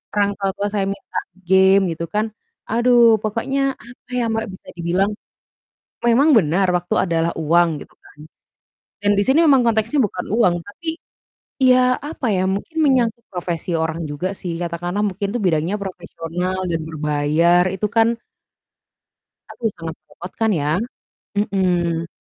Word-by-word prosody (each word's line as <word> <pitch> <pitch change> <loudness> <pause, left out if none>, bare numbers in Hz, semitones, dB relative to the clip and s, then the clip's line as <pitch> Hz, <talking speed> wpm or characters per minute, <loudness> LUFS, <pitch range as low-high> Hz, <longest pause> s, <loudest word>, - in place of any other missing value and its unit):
orang 205 -1 +3
tua 195 -1 0
tua 205 - -1
saya 200 -2 0
minta 195 0 -4 0.3
game, 190 +1 +6
gitu 165 +1 -4
kan. 210 +1 +1 0.4
Aduh 235 -1 +5
pokoknya, 230 +6 -1 0.3
apa 245 - -17
ya, - - +1
Mbak, 225 0 -1
bisa 185 - -14
dibilang 180 +4 +1 1.0
memang 265 +7 +5
benar 185 +1 +2
waktu 175 +5 -3
adalah 165 -1 +1
uang 170 +2 +3 0.2
gitu - - -28
kan - - -19 0.9
dan 205 - +3
di - - +4
sini 270 +5 +4
memang 270 -4 +5
konteksnya 225 +3 +1
bukan 180 -2 -6
uang 185 -7 +4
tapi, 265 +11 -10 0.7
ya 255 0 +5
apa 280 -6 -4
ya, 185 - +1
mungkin 320 +11 -7
menyangkut 240 -4 +2
profesi 175 -1 -4
orang 160 +1 -3
juga 145 +6 -3
sih. 175 -2 -3
Katakanlah 175 +3 -3
mungkin 200 +2 -3
tuh - - 0
bidangnya 165 +2 +1
yang - - -4
profesional 180 0 -4
dan 165 -1 -1
berbayar 155 +3 +2
itu 210 +3 -1
kan 225 0 +6 1.4
aduh 230 -2 -2
sangat 165 -1 -6
merepotkan 215 +5 -3
ya. 150 -3 0 0.7
Mhm. 175 -5 0
190 Hz, 145 wpm, -20 LUFS, 170-225 Hz, 1.4 s, game